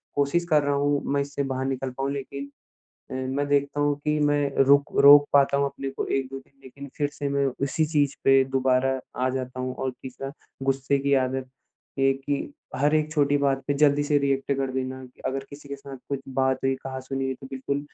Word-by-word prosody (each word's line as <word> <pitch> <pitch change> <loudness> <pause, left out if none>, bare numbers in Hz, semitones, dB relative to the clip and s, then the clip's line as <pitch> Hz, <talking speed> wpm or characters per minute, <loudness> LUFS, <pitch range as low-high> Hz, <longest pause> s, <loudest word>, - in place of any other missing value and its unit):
कोशिश 145 +5 +1
कर 150 -2 +5
रहा 140 0 +1
हूँ 145 0 +1
मैं 140 - +2
इससे 140 0 -3
बाहर 130 -1 -2
निकल 135 0 -2
पाऊ 135 0 -1
लेकिन, 140 0 -5 0.6
अ, - - -5 0.2
मैं 145 0 0
देखता 140 0 +1
हूँ 145 0 +2
कि 150 0 +1
मैं 145 0 +2 0.2
रुक 140 +1 +4
रोक 145 +1 +9
पाता 140 0 +4
हूँ 140 - +2
अपने 135 0 -5
को 135 - -4
1-2 135 0 -2
दिन 135 +1 -21
लेकिन 140 +2 -10
फिर 145 -1 0
से 145 -1 -3
मैं 140 0 +1 0.2
उसी 155 +3 0
चीज 145 -3 +1
पे 135 0 +6
दुबारा 130 0 +2 0.2
आ - - +3
जाता 130 -1 -4
हूँ 130 0 -3
और 130 - -2
तीसरा 135 +1 -7 0.3
गुस्से 135 +1 +1
की 140 0 +2
आदत, 130 0 0 0.5
ये 135 0 +4
कि 140 +1 -3 0.2
हर 145 +2 +2
एक 155 0 +1
छोटी 145 -2 +3
बात 135 -1 +1
पे 145 - +1
जल्दी 145 0 +4
से 145 0 +3
रिएक्ट 140 0 0
कर 135 -1 -1
देना। 130 0 -3 0.3
अगर 135 +1 -2
किसी 140 0 -12
के 140 - -5
साथ 140 -1 -10
कुछ 140 -1 -2
बात 130 0 +1
हुई, 135 0 +2
कहा-सुनी 135 0 -4
हुई 130 0 -1
तो 135 - -9
बिल्कुल 135 +2 -2
140 Hz, 210 wpm, -25 LUFS, 135-145 Hz, 0.6 s, रोक